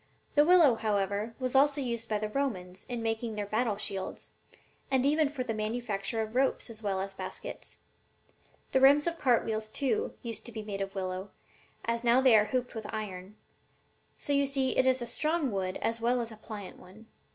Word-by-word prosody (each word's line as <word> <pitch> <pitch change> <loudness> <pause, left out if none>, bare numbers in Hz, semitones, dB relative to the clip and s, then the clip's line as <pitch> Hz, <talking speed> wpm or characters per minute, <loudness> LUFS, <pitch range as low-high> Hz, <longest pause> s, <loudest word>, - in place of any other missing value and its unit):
The 295 - +6
willow, 330 -5 +7
however, 210 0 -1
was 255 -1 -2
also 285 +2 +4
used 235 -3 -3
by 215 - +1
the 215 +1 -2
Romans 190 -9 -3
in 240 -2 -3
making 225 0 -1
their 205 -1 -2
battle 215 0 0
shields, 195 -2 -5 0.6
and 265 -1 +2
even 300 +1 +3
for 280 -3 -3
the 230 - -2
manufacture 220 0 -2
of 220 0 -7
ropes 260 -1 +1
as 220 -1 -11
well 195 -3 -1
as 195 +1 -4
baskets. - - -7 0.9
The 265 - +3
rims 285 +2 +7
of 340 -1 -1
cart 245 -4 +3
wheels, 215 -1 -2
too, 290 - -1
used 225 -2 -6
to - - -7
be 220 -1 -6
made 200 -2 -4
of 195 0 -4
willow, 185 +1 -3 0.6
as 230 +1 -1
now 240 +1 +5
they 260 -3 +6
are 210 -1 +6
hooped 250 +2 -2
with 220 -3 -6
iron; 200 -2 -6 0.8
so, 285 - -1
you 280 0 +3
see, 270 -1 0
it 260 - +3
is 260 -1 +3
a - - -3
strong 305 +2 0
wood 185 -2 -2
as 230 0 -1
well 245 +2 +2
as 230 -1 -4
a - - -9
pliant 210 -3 -8
one. 190 +5 -15
230 Hz, 200 wpm, -30 LUFS, 210-260 Hz, 0.9 s, willow